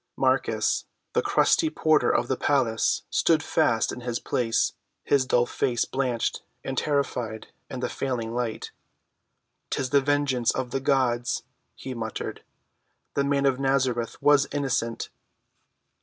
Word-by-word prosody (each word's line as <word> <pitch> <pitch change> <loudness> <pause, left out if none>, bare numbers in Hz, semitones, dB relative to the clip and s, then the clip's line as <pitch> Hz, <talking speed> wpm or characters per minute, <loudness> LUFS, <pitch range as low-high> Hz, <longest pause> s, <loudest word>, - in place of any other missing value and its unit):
Marcus, - - +1 0.3
the - - +3
crusty 320 - +3
porter 155 - +3
of 120 - +1
the 130 - 0
palace, 125 -5 +1
stood 160 -3 +3
fast 115 -1 +2
in 125 - -7
his 120 -1 -2
place, 115 -2 0 0.3
his 135 -2 +2
dull 120 0 +3
face 120 -1 0
blanched 125 -4 -1 0.2
and 135 - -4
terrified 125 -6 -1 0.2
in - - -5
the - - 0
failing 120 -4 -3
light. 120 -2 -3 1.0
"'Tis 130 -1 -2
the 140 -1 +5
vengeance 140 -4 +1
of 125 -2 -1
the 135 - 0
gods," 125 -3 +1 0.3
he 130 - -6
muttered. 110 -2 -5 0.7
"The 140 - +1
Man 140 0 +1
of 135 -1 +2
Nazareth 130 -4 0
was 145 -1 +5
innocent!" 125 -5 -1
130 Hz, 135 wpm, -26 LUFS, 120-140 Hz, 1.0 s, the